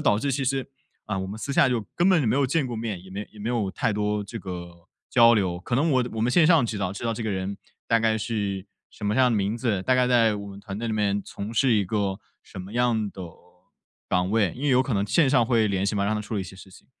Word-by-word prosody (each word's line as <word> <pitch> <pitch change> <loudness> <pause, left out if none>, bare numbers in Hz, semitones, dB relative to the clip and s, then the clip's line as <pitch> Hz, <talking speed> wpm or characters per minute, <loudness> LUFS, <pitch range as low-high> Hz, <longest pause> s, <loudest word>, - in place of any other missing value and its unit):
导 105 - +3
致 140 - -1
其 135 +1 -1
实 135 0 0 0.4
啊， 100 -2 -2
我 95 - -3
们 100 +3 -6
私 140 +5 -4
下 135 - +4
就 120 -4 -1
根 175 +2 +3
本 180 -5 +4
就 120 - +1
没 130 - +2
有 140 - +3
见 145 +3 +1
过 120 -2 -4
面， 110 -5 -4
也 95 - -14
没 100 +2 -6
也 105 - -13
没 110 - -3
有 115 -5 0
太 115 - 0
多 105 0 -1
这 105 +3 -7
个 90 -3 -7 0.3
交 120 -1 +6
流。 95 -5 0
可 120 +6 -4
能 150 +6 +2
我 130 -3 +2
我 110 - -4
们 115 +3 +2
线 160 +4 +5
上 165 -6 +5
知 110 -2 -3
道 95 -2 -2
知 100 - -8
道 115 - 0
这 115 0 -5
个 110 - -1
人 95 +1 -3 0.3
大 115 - +4
概 110 -1 +2
是 105 -3 -3 0.2
什 - - -10
么 105 +1 0
样 125 -1 +4
的 110 - +1
名 100 +3 0
字， 110 -7 0
大 130 +5 +2
概 125 0 +3
在 115 -4 +3
我 100 - -7
们 100 0 -10
团 100 -1 -7
队 115 - -3
里 110 - -1
面 100 -1 +1
从 105 +3 -7
事 125 +2 +3
一 105 -3 +2
个 100 0 -2 0.2
什 95 - -9
么 100 +5 -10
样 115 -4 +1
的 95 - -11 0.9
岗 90 0 +1
位， 105 -5 +2
因 130 - -9
为 145 - +1
有 130 -1 +4
可 130 -2 -1
能 100 0 +1
线 140 +7 +3
上 130 -3 +4
会 115 -2 +2
联 100 -2 0
系 105 +1 0
嘛， 100 - +1
让 105 +2 0
他 105 - -2
处 105 +1 -5
理 - - 0
一 - - -4
些 95 - -10
事 95 0 -14
情。 - - -17
110 Hz, 320 characters per minute, -25 LUFS, 100-125 Hz, 0.9 s, 交